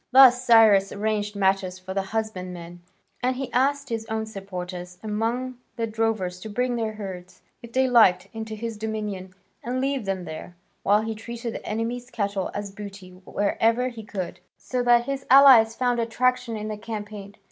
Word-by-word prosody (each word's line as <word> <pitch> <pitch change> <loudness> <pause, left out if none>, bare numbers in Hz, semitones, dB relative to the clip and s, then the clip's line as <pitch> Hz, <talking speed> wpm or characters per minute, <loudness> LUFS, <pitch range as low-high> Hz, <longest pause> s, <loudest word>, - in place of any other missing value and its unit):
Thus 255 -1 +8
Cyrus 220 -5 +6
arranged 210 0 -2
matters 190 -2 +1
for 185 0 -7
the 195 - 0
husbandmen, 185 -5 -5 0.4
and 255 +1 +1
he 265 +1 -5
asked 280 +2 +1
his 225 -1 -3
own 220 0 -2
supporters 180 -3 -7
among 235 +4 -2 0.2
the 230 - -1
drovers 220 -5 -1
to 215 - -8
bring 245 +3 0
their 220 -2 -2
herds, 190 -4 -8 0.2
if 235 -1 -11
they 260 +2 +2
liked, 220 -8 +5
into 220 -1 -5
his 225 0 -5
dominions 210 -4 -4 0.3
and 250 +2 -2
leave 270 -3 -1
them 190 -2 -2
there, 160 +2 -8 0.3
while 205 +2 +3
he 225 0 -3
treated 235 +1 -6
the - - -7
enemy's 235 +3 -3
cattle 200 -5 -2
as 205 -1 -4
booty 195 -2 -9
wherever 220 +6 0
he 230 -3 -9
could, 190 -5 -5 0.2
so 250 -1 -3
that 240 -1 +4
his 275 -1 -4
allies 255 -5 +8
found 245 -1 +1
attraction 235 0 0
in 215 0 -5
the 215 -1 -4
campaign. 210 -2 -7
220 Hz, 170 wpm, -25 LUFS, 195-240 Hz, 0.4 s, Thus